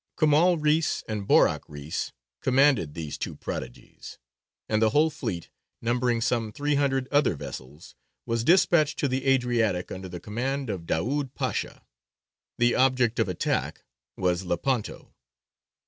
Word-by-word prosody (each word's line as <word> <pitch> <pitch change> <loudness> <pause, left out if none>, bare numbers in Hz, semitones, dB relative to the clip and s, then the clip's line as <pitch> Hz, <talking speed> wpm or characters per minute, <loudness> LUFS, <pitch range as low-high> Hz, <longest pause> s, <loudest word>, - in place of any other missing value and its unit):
Kemāl 160 +3 +4
Reïs 155 +1 +1
and 105 -2 -4
Borāk - - +4
Reïs 75 +1 -4 0.3
commanded 130 - +3
these 80 -3 -5
two - - -4
prodigies, - - -8 0.5
and 110 0 +1
the 110 - +5
whole 155 +6 +3
fleet, 110 - -5 0.3
numbering 120 0 0
some 115 -2 0
three 145 +5 -1
hundred 135 -2 +1
other 145 - +3
vessels, 70 +2 -9 0.3
was 115 0 -1
despatched 160 -1 +4
to 140 - +1
the 130 +1 -2
Adriatic 120 -8 +1
under 95 0 -6
the 90 0 -7
command 125 +6 -3
of 85 -4 -6
Daūd 130 - -1
Pasha. - - -3 0.7
The 120 0 +3
object 125 -3 +2
of 110 - +1
attack 90 - -2 0.3
was 90 -1 0
Lepanto. 105 +7 -2
120 Hz, 135 wpm, -26 LUFS, 95-140 Hz, 0.7 s, the